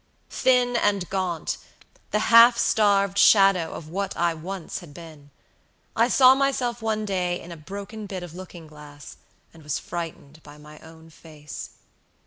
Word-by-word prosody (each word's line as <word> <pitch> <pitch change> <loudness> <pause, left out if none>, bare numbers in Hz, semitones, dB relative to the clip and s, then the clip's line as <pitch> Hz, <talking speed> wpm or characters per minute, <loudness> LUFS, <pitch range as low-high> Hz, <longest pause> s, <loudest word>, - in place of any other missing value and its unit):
Thin 250 -1 +2
and 200 -5 0
gaunt, 185 -4 -3 0.5
the 215 +2 -1
half 235 +1 +8
starved 200 -4 +2
shadow 195 -5 +5
of 155 - -9
what 195 +4 -4
I 170 -1 +1
once 175 +2 -7
had 150 -5 -14
been, 155 -4 -13 0.7
I 230 +1 +3
saw 255 0 +6
myself 260 -3 -1
one 215 -1 -2
day 180 -3 -2
in 175 - -12
a - - -7
broken 200 +6 -9
bit 190 -2 -6
of 175 -3 -10
looking 180 -2 -11
glass, 150 -1 -13 0.4
and 165 - -16
was 150 -2 -3
frightened 160 -3 -8
by 150 0 -15
my 150 0 -14
own 160 0 -16
face. 150 -2 -11
180 Hz, 155 wpm, -24 LUFS, 160-215 Hz, 0.7 s, half